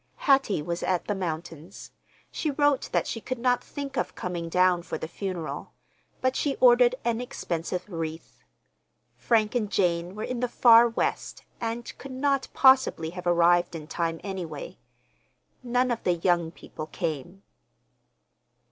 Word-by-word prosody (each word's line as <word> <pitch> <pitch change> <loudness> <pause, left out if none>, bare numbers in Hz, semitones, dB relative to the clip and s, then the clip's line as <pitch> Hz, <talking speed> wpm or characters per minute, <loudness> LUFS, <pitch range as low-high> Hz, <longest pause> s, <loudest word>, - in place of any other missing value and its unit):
Hattie 270 - +2
was 170 +2 -3
at 180 -2 0
the 210 - -1
mountains. 170 -1 -6 0.4
She 310 - -2
wrote 290 -1 +1
that - - +1
she 225 - -4
could 255 +3 -4
not 245 +1 +1
think 280 -1 -6
of - - -2
coming 175 -2 -4
down 180 0 +3
for - - -5
the - - -5
funeral, 170 -5 -5 0.5
but 260 0 +1
she 285 -2 0
ordered 245 0 +5
an 235 0 0
expensive 180 -7 -4
wreath. 165 -3 -6 0.8
Frank 220 -3 +1
and 215 -5 -1
Jane 175 0 0
were 215 - -5
in 250 -1 -3
the 250 - 0
Far 235 -1 +6
West, 230 - -2 0.2
and 230 +1 -4
could 275 -1 -8
not 275 0 0
possibly 260 -12 +4
have 180 0 -7
arrived 175 0 +3
in 155 -2 -7
time, 165 0 -2
anyway. 190 - -6 0.8
None 250 0 +1
of 235 - -2
the 180 - +2
young 170 -1 +1
people 155 -1 -9
came. 170 +3 -5
195 Hz, 150 wpm, -27 LUFS, 170-245 Hz, 0.8 s, Far